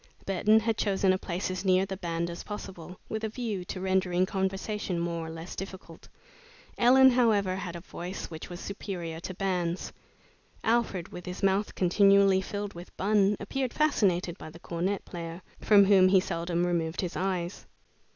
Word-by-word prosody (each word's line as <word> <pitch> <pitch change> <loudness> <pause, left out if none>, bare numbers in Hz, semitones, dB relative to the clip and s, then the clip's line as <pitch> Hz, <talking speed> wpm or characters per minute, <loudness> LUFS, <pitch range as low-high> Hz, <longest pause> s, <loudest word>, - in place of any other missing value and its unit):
Burton 205 +3 +4
had 225 -1 -1
chosen 195 -2 +2
a - - +1
place 185 +1 -3
as 185 - -4
near 185 0 +3
the 195 0 -5
band 170 -2 -3
as 170 - -7
possible, 185 -4 -8
with 220 0 -4
a 220 - -1
view 215 -5 -3
to 185 - -5
rendering 185 -1 +1
conversation 190 0 -2
more 170 -1 -2
or - - -6
less 165 +2 -8
difficult. 190 -3 -9 0.7
Ellen, 260 +2 +6
however, 215 -6 +2
had 180 -2 -5
a 170 - -7
voice 180 +1 -6
which 160 -1 -8
was 175 -1 -7
superior 175 -5 -5
to 185 +2 -6
bands. 180 -2 -2 0.7
Alfred, 225 -6 0
with 180 - -9
his 180 +2 -6
mouth 195 +2 +1
continually 195 +1 +5
filled 205 +1 -5
with 175 +1 -11
bun, 205 0 +3
appeared 255 +5 -3
fascinated 190 - +1
by - - -8
the 155 - -12
cornet 180 +4 -2
player, 170 +1 -7 0.2
from 205 -2 +6
whom 190 -2 +6
he 190 0 +5
seldom 170 -1 -1
removed 170 -1 -1
his 180 -2 -4
eyes. 180 -1 -2
190 Hz, 170 wpm, -28 LUFS, 175-200 Hz, 0.7 s, Ellen